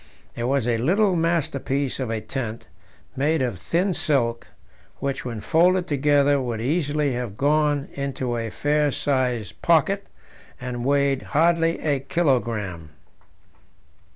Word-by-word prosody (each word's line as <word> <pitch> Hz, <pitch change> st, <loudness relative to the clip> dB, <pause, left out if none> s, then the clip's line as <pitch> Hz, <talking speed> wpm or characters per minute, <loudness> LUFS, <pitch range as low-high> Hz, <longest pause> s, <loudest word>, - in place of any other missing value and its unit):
It 120 Hz, -, -3 dB
was 130 Hz, -2 st, +1 dB
a 115 Hz, -2 st, +1 dB
little 190 Hz, -, +2 dB
masterpiece 145 Hz, -5 st, -1 dB
of 130 Hz, -3 st, -2 dB
a 115 Hz, -1 st, -2 dB
tent, 115 Hz, -3 st, -5 dB, 0.5 s
made 145 Hz, +2 st, +1 dB
of 115 Hz, -8 st, -3 dB
thin 180 Hz, -, 0 dB
silk, 120 Hz, -8 st, 0 dB, 0.5 s
which, 140 Hz, 0 st, -3 dB
when 115 Hz, -4 st, -5 dB
folded 180 Hz, -, +3 dB
together, 145 Hz, -2 st, +3 dB
would 120 Hz, -3 st, -3 dB
easily 145 Hz, +1 st, 0 dB
have 120 Hz, -5 st, -4 dB
gone 145 Hz, 0 st, +2 dB
into 135 Hz, -3 st, -3 dB
a 115 Hz, -1 st, -3 dB
fair 150 Hz, +4 st, +1 dB
sized 125 Hz, -7 st, -1 dB
pocket, 170 Hz, +5 st, +2 dB, 0.5 s
and 125 Hz, -1 st, -4 dB
weighed 140 Hz, 0 st, +2 dB
hardly 165 Hz, +1 st, +2 dB
a 145 Hz, -3 st, +1 dB
kilogram. 120 Hz, -, -1 dB
140 Hz, 125 wpm, -23 LUFS, 120-155 Hz, 0.5 s, folded